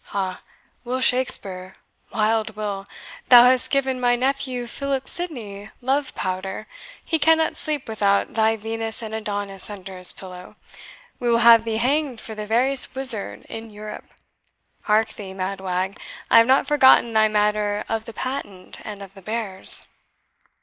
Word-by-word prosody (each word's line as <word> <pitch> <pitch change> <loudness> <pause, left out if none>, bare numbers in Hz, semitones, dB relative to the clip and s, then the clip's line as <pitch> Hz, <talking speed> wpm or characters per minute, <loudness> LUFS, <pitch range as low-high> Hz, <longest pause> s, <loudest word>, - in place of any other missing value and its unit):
Ha, 190 -2 -4 0.4
Will 250 +1 -3
Shakespeare 195 -8 0 0.4
wild 220 0 0
Will! 205 -2 -5 0.4
thou 245 -1 +10
hast 250 0 +4
given 265 -2 0
my 245 -1 +2
nephew 260 -1 -2
Philip 270 +2 -3
Sidney, 220 - -4
love 270 +3 -1
powder; 185 +3 -4 0.4
he 320 - 0
cannot 320 +1 +3
sleep 300 -3 -2
without 200 -2 0
thy 220 0 +2
Venus 225 +1 -4
and 220 -1 -6
Adonis 205 -3 -4
under 195 -2 -9
his 180 -1 +5
pillow! 180 -1 -11 0.6
We 245 - -1
will 230 - +4
have 230 -1 +7
thee 225 -1 -1
hanged 265 +1 0
for 220 - -7
the 210 -1 -6
veriest 255 +5 +1
wizard 260 -6 +2
in 225 0 -8
Europe. 210 0 -9 0.8
Hark 215 +1 +2
thee, 195 -3 -9
mad 190 +1 -4
wag, 185 +1 -3 0.3
I - - +8
have 230 - +4
not 265 +1 +4
forgotten 260 -5 +5
thy 220 0 +4
matter 210 0 0
of 225 0 -3
the 230 - -9
patent, 220 -9 -6
and 205 -2 -8
of 195 -1 -13
the 195 - -14
bears." 210 -2 +1
220 Hz, 155 wpm, -22 LUFS, 200-255 Hz, 0.8 s, thou